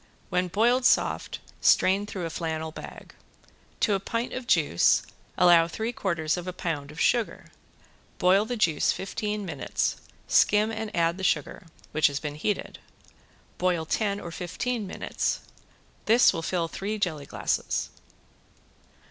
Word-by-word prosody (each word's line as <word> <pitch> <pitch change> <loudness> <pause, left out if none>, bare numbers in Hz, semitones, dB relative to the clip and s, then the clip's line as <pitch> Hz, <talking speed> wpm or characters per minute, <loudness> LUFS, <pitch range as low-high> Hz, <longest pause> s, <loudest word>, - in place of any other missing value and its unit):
When 180 +1 +1
boiled 235 +7 +2
soft - - +2 0.2
strain 195 +2 +4
through 190 -4 -4
a 165 - -4
flannel 160 -1 -3
bag. - - -10 0.7
To 210 - +3
a 195 - +1
pint 230 +5 -3
of 255 -1 -5
juice 150 - +3 0.3
allow 170 -2 +6
three 220 +7 -3
quarters 170 -6 -1
of 180 0 -6
a 185 - -3
pound 155 -5 -3
of 150 +3 -10
sugar. 240 -3 0 0.7
Boil 190 +3 +4
the 245 +2 -3
juice 165 -8 +2
fifteen 210 +1 -3
minutes, 150 -7 -2 0.3
skim 210 +2 +4
and 220 -1 -4
add 170 +1 +1
the - - -5
sugar, 165 0 -1 0.2
which 155 0 +4
has 140 -1 -3
been 150 -2 -4
heated. 175 +8 -3 0.8
Boil 175 -3 +1
ten 200 +3 0
or 170 - -7
fifteen 200 +6 -3
minutes. - - -2 0.6
This 230 +3 +6
will 165 - -3
fill 170 0 -1
three 205 +6 -4
jelly 155 -8 -2
glasses. - - -2
180 Hz, 145 wpm, -27 LUFS, 165-210 Hz, 0.8 s, allow